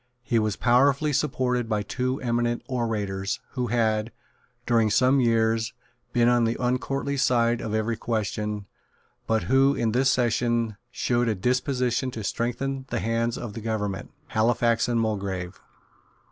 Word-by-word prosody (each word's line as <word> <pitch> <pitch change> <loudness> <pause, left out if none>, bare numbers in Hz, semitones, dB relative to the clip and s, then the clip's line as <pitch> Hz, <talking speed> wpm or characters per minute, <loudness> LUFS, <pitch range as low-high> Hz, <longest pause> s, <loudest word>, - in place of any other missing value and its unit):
He 120 -2 +1
was 110 -2 0
powerfully 140 +6 +3
supported 125 -4 0
by 105 -2 0
two 130 +5 -2
eminent 120 -1 0
orators, 105 -6 -2
who 125 -2 -2
had, 110 -2 +1 0.5
during 115 -2 +3
some 130 +5 +4
years, 115 -1 +2 0.4
been 120 -1 +3
on 120 -1 +4
the 115 +1 0
uncourtly 135 +3 -1
side 120 -2 +2
of 110 -1 -3
every 110 +1 0
question, 105 -2 -2 0.6
but 110 -1 +1
who, 135 +2 +3
in 115 -3 0
this 130 +3 +3
session, 120 -3 +1
showed 120 0 0
a 110 - +1
disposition 125 +3 0
to 115 -4 -6
strengthen 130 +5 -2
the 120 - -1
hands 115 +1 0
of 115 -4 -6
the 115 - -6
government, 105 -3 -3 0.2
Halifax 115 +1 +2
and 120 -1 +1
Mulgrave. 100 -4 -2
120 Hz, 145 wpm, -25 LUFS, 110-125 Hz, 0.6 s, some